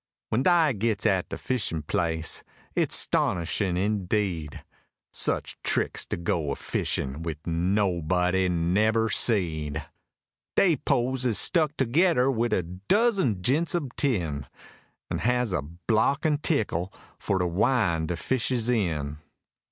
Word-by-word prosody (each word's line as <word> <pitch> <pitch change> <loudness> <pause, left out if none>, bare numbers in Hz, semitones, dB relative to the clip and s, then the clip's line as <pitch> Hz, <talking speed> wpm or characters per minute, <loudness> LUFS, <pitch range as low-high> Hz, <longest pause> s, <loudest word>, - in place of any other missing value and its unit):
When 110 - +1
dy 165 -2 +4
gits 110 0 -1
at 95 -2 +1
de - - -5
fishin' 100 - -2
place, 80 +1 -1 0.3
it's - - +2
'stonishin' 90 +2 +1
indeed! 95 -5 -1 0.5
Such - - 0
tricks - - 0
to - - -3
go 85 -3 -1
a 70 - -1
fishin' 70 +3 -3
wid 80 -2 -4
nobody 90 0 +1
nebber 105 +7 +2
seed: 80 -8 0 0.7
Dey 175 -6 +4
poles 125 +1 0
is 110 -5 +2
stuck 155 - +2
togedder 135 +1 +3
wid 120 -1 0
a 90 - +1
dozen 115 - +1
jints 160 - +2
ob 145 -8 -3
tin, 80 - -1 0.6
An' - - -1
has 125 -1 +1
a 90 - 0
block 110 - 0
an' 150 -2 +2
teeckle 105 - 0 0.3
for 95 - 0
to 90 - 0
win' 85 -3 +1
de 90 - -2
fishes 125 +3 0
in! 75 -10 -1
100 Hz, 130 wpm, -26 LUFS, 85-125 Hz, 0.7 s, dy